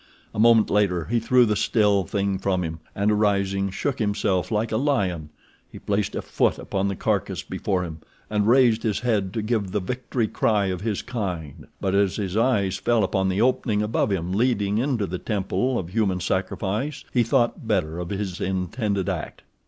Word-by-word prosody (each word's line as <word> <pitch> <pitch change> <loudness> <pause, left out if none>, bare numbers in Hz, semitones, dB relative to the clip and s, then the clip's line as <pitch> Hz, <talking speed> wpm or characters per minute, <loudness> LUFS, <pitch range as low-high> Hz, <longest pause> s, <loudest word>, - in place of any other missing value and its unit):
A - - -4
moment 115 -1 +5
later 95 -5 +2
he 120 +2 +1
threw 125 +2 +4
the 105 -2 +1
still 105 -2 +2
thing 100 +2 -1
from 95 -2 0
him, 80 -1 -5 0.2
and, 100 +2 +2
arising, 100 -2 +1
shook 130 +8 -2
himself 100 -4 0
like 110 +1 -1
a 110 - +1
lion. 95 - 0 0.4
He - - -10
placed 100 0 -1
a - - -3
foot - - +1
upon 95 0 -2
the 100 - -2
carcass - - -1
before 95 -3 -2
him, 80 -2 -7 0.3
and 105 -1 0
raised 120 -2 +5
his 105 -3 -1
head 105 -6 0
to 110 - -2
give 105 -3 -1
the 105 - +1
victory 120 +3 -2
cry 105 -2 +1
of 90 - -6
his 105 -2 -2
kind, 90 - -5
but 95 - -1
as 100 -2 +2
his 100 -3 -3
eyes 105 -5 +2
fell 120 -3 +2
upon 95 0 +1
the 95 +3 0
opening 115 -4 +1
above 105 +1 0
him 90 -2 -1
leading 105 -1 +1
into 125 -5 0
the 90 -1 -4
temple 115 +5 -1
of 85 - -4
human 95 -2 0
sacrifice 100 - -2
he 125 - +4
thought 120 0 +1
better 90 -6 0
of 90 -1 -5
his 95 -3 -4
intended 95 +1 -1
act. - - -4
100 Hz, 190 wpm, -24 LUFS, 95-115 Hz, 0.4 s, moment